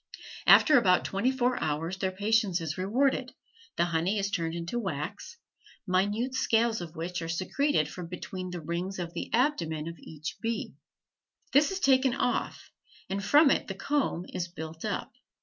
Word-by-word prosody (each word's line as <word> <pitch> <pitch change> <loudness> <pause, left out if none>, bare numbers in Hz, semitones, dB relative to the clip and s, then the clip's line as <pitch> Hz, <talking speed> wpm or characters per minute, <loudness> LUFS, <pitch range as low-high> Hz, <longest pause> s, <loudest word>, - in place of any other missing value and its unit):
After 300 -5 +8
about 185 -5 +3
twenty 200 +6 +1
four 250 -1 0
hours 160 +4 -2
their 190 -1 0
patience 205 -1 +1
is 160 -2 -3
rewarded, 255 +6 0 0.4
the 170 - +2
honey 170 +4 0
is 200 0 -1
turned 165 -4 -1
into 170 +8 -3
wax, 200 - -5 0.5
minute 205 +7 0
scales 230 -3 +2
of 170 -1 -8
which 175 +2 -4
are 165 - -5
secreted 185 - +1
from 175 +2 -7
between 185 +1 -6
the 175 -1 -5
rings 175 +4 -3
of 170 -2 -5
the 170 - -5
abdomen 170 - 0
of 165 -1 -7
each 155 +1 -7
bee; 230 -1 -2 0.8
this 290 +2 +5
is 385 0 -3
taken 265 -4 +3
off 245 - -2 0.4
and 195 +1 -2
from 290 +6 +6
it - - +1
the 195 - -5
comb 265 - -1
is 175 - -2
built 160 -2 -8
up. - - -3
190 Hz, 165 wpm, -29 LUFS, 170-240 Hz, 0.8 s, After